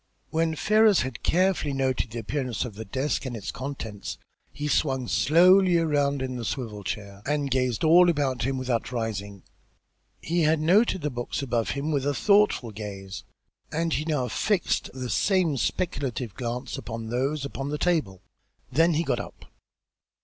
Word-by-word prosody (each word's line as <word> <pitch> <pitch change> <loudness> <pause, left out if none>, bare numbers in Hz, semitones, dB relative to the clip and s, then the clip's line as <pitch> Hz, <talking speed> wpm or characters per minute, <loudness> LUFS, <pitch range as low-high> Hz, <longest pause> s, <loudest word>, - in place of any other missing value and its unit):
When 160 0 +1
Ferrars 215 +3 +4
had 130 -3 -5
carefully 180 -5 +1
noted 130 -3 0
the 115 - -7
appearance 130 +2 -2
of 120 - -7
the 110 +3 -8
desk 130 +9 -1
and 120 -2 -4
its 105 - -5
contents, 120 -6 -6 0.3
he 145 +1 -4
swung 135 -4 +1
slowly 180 +5 +5
around 145 -4 +1
in 130 -1 -4
the 120 - -5
swivel 105 -1 -4
chair 100 0 -5
and 145 -1 0
gazed 125 -1 0
all 175 +3 +7
about 140 -6 0
him 135 +2 -1
without 125 -2 -2
rising. 100 -5 -4 0.8
He 170 +2 -1
had 155 0 +3
noted 190 +4 +3
the 150 0 -2
books 120 +3 -4
above 120 -3 -1
him 145 +3 -2
with 140 -2 0
a 145 - 0
thoughtful 200 - +3
gaze, 100 -2 -7 0.5
and 165 +1 0
he 150 - 0
now 150 -6 0
fixed 195 - 0
that 130 -2 -5
same 185 -6 +2
speculative 130 - -2
glance 120 +3 -4
upon 115 0 -6
those 135 +4 -1
upon 140 0 -5
the 150 - -2
table. 150 - 0 0.5
Then 165 +5 +3
he 165 - +1
got - - 0
up. - - -9
135 Hz, 165 wpm, -26 LUFS, 115-160 Hz, 0.8 s, all